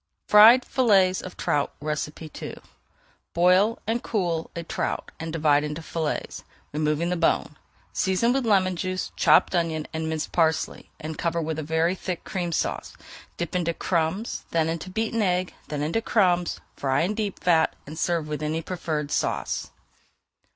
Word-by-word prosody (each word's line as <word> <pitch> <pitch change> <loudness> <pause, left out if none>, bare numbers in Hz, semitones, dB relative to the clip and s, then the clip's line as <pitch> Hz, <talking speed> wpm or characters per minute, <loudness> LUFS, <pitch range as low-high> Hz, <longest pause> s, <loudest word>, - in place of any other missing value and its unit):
FRIED 225 +4 +8
FILLETS 195 -7 +3
OF 185 - -9
TROUT 145 -1 0
II 150 +1 -5 0.8
Boil 185 +6 +4
and 225 +3 0
cool 175 -6 -1
a 170 - -4
trout - - -3
and 165 0 -4
divide 150 -2 +3
into 150 +2 -4
fillets, 160 -2 -3 0.3
removing 150 +3 0
the - - +1
bone. 165 -3 +1 0.4
Season 190 +6 +2
with 270 0 +1
lemon 190 -5 +3
juice, 185 +1 -3
chopped - - +4
onion, 165 -3 0
and 160 0 -2
minced 160 -1 -3
parsley, 160 -2 0
and 155 0 -6
cover 170 0 0
with 160 -1 -2
a - - -1
very 160 +3 +1
thick 185 -2 -5
Cream 175 -2 -3
Sauce. - - -2 0.4
Dip 170 0 -4
into 170 -2 0
crumbs, 175 +5 -1
then 160 -1 +1
into 165 +3 -4
beaten 225 +3 -1
egg, 180 -2 0
then 145 -1 -3
into 165 +9 0
crumbs, 180 -6 +2 0.2
fry 135 0 +1
in 180 +6 0
deep 210 -3 -3
fat, 165 -3 +3
and 155 - -8
serve 170 -3 0
with 150 -1 -4
any 155 +2 -2
preferred 155 -4 -3
sauce. - - -1
170 Hz, 160 wpm, -25 LUFS, 155-185 Hz, 0.8 s, FRIED